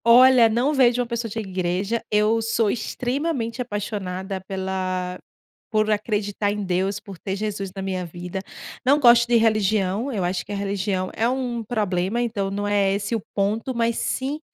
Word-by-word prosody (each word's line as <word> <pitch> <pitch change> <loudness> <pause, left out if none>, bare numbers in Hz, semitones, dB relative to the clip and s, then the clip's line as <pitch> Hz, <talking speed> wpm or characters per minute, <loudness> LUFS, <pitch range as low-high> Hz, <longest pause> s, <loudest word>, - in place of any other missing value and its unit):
Olha, 245 0 +7
não 245 +7 +1
vejo 250 -3 +4
uma 245 - +1
pessoa 235 -1 -3
de 215 - -7
igreja. 190 +2 -1
Eu 215 +2 +3
sou 225 -1 +1
extremamente 255 0 -2
apaixonada 195 -4 -4
pela 185 -1 -3 0.5
por 215 -1 +1
acreditar 205 -1 0
em 205 0 -3
Deus, 190 +2 0
por 195 -3 -11
ter 190 -1 -3
Jesus 200 -2 -3
na 195 - -6
minha 190 -1 -2
vida. 175 +3 -6 0.4
Não 280 +3 +5
gosto 235 -3 +6
de 240 - +3
religião, 215 +1 +1
eu 205 -7 -1
acho 180 +1 -1
que - - -9
a - - -2
religião 195 -1 -1
é 230 +2 +1
um 250 -3 -2
problema, 210 -1 -1
então 210 -5 -1
não 205 +1 -2
é 200 -1 +2
esse 205 +3 -1
o 225 - -2
ponto, 215 +6 0
mas 235 -1 0
sim 275 +4 -2
210 Hz, 175 wpm, -23 LUFS, 195-235 Hz, 0.5 s, Olha